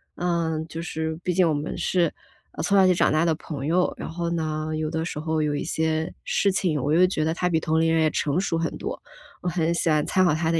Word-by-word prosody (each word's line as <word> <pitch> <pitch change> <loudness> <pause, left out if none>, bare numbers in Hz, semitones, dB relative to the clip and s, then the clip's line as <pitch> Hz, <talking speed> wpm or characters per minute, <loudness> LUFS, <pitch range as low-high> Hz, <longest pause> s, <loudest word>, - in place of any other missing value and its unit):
嗯， 165 -3 -1
就 165 +1 -6
是 160 -2 -3
毕 180 - 0
竟 180 0 +4
我 160 - +2
们 145 +2 -3
是， 175 -2 +2 0.5
嗯， - - -4
从 200 +4 +2
小 190 - +6
一 - - +5
起 180 - +4
长 - - +3
大 155 +1 +3
的 160 -2 +2
朋 145 -4 -6
友。 180 +2 +2
然 - - -6
后 170 +1 -3
呢， 155 -2 -2
有 155 0 -2
的 160 0 -2
时 150 - -4
候 160 0 -1
有 145 -1 0
一 - - -2
些 160 0 -1
事 200 - +2
情， 170 -7 0
我 145 - -1
又 180 +2 +6
觉 155 -4 -1
得 160 - +1
他 180 - 0
比 160 - +2
同 160 0 0
龄 165 0 +2
人 160 - +3
也 155 - +3
成 145 +3 0
熟 185 -3 0
很 165 0 -2
多， - - -4 0.4
我 180 - -1
很 165 -1 0
喜 170 - +1
欢 150 -1 +3
参 185 0 +3
考 175 - +3
他 160 0 0
的 165 - +2
160 Hz, 295 characters per minute, -25 LUFS, 155-175 Hz, 0.5 s, 小